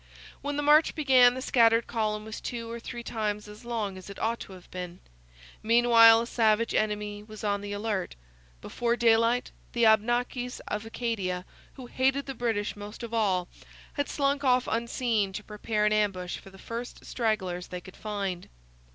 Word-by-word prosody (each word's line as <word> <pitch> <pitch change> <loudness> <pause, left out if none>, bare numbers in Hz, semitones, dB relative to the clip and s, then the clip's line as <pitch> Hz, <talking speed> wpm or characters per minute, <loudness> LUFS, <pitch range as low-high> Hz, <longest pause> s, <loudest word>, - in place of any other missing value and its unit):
When 285 +1 -3
the 295 - 0
march 300 +2 +5
began 255 -5 +5
the 260 - -5
scattered 230 -2 +4
column 215 -2 -2
was 220 0 -7
two 230 -1 -5
or 235 - -5
three 240 +1 -7
times 210 -2 -3
as 210 +3 -12
long 215 -5 -3
as 185 - -12
it 200 - -9
ought 230 +1 -1
to 195 - -9
have 185 -1 -13
been. 180 -1 -6 0.6
Meanwhile 230 0 +7
a - - -2
savage 230 -1 +2
enemy 210 -1 -1
was 215 0 -11
on 205 -1 0
the 205 0 -6
alert. 205 -2 -2 0.5
Before 235 0 -1
daylight 230 +1 +3 0.2
the 235 -2 +3
Abnakis 240 +3 +2
of 210 +1 -3
Acadia, 195 -6 -3 0.3
who 260 - -10
hated 265 +3 0
the 270 - -5
British 225 -4 -1
most 205 +3 -9
of 235 0 -6
all, 190 -6 +1 0.5
had 285 -1 -2
slunk 280 0 0
off 250 -2 +3
unseen 230 -3 0
to 210 - -5
prepare 210 0 -1
an 210 - +3
ambush 195 -4 0
for - - -14
the 195 - -15
first 230 +5 -7
stragglers 190 -7 -1
they 180 - -6
could 185 +1 -14
find. 200 -4 -4
225 Hz, 175 wpm, -28 LUFS, 205-240 Hz, 0.6 s, Meanwhile